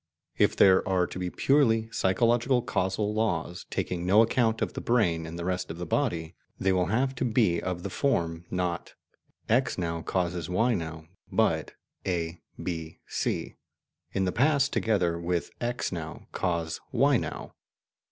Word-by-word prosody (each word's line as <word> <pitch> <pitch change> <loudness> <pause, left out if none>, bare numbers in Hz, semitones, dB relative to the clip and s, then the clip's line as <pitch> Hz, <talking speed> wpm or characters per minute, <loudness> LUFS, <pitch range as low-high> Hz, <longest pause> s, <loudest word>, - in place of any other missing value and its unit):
If - - +3
there 95 -1 +5
are 90 -1 +3
to 90 - -7
be 90 -1 -2
purely 115 -2 +3
psychological 120 +5 +2
causal 105 -1 0
laws, 90 -5 -1
taking 85 -1 -2
no 100 +5 +6
account 115 -1 +1
of - - -3
the - - -5
brain 85 -9 +1
and 80 +1 -7
the 85 - -4
rest 90 0 -2
of 80 - -6
the 90 - -4
body, 85 - -1 0.3
they 95 0 +2
will 90 -1 +2
have 130 +6 +1
to - - -1
be 110 -8 +2
of 90 -1 -3
the - - -3
form, 85 - 0
not 90 -2 -2 0.5
"X 125 +4 +2
now 85 -2 -2
causes 90 -1 -2
Y 115 +7 +2
now," 80 -4 -4 0.3
but - - +1 0.3
"A, 85 -2 -2 0.2
B, 80 -2 -4
C,... - - -2 0.5
in 95 -1 0
the 90 - +1
past, 140 +3 +2
together 90 -6 +1
with 85 0 -2
X 120 0 -1
now, 80 -4 -6
cause 85 -3 -2
Y 135 +2 +4
now." - - -5
95 Hz, 160 wpm, -28 LUFS, 85-115 Hz, 0.5 s, no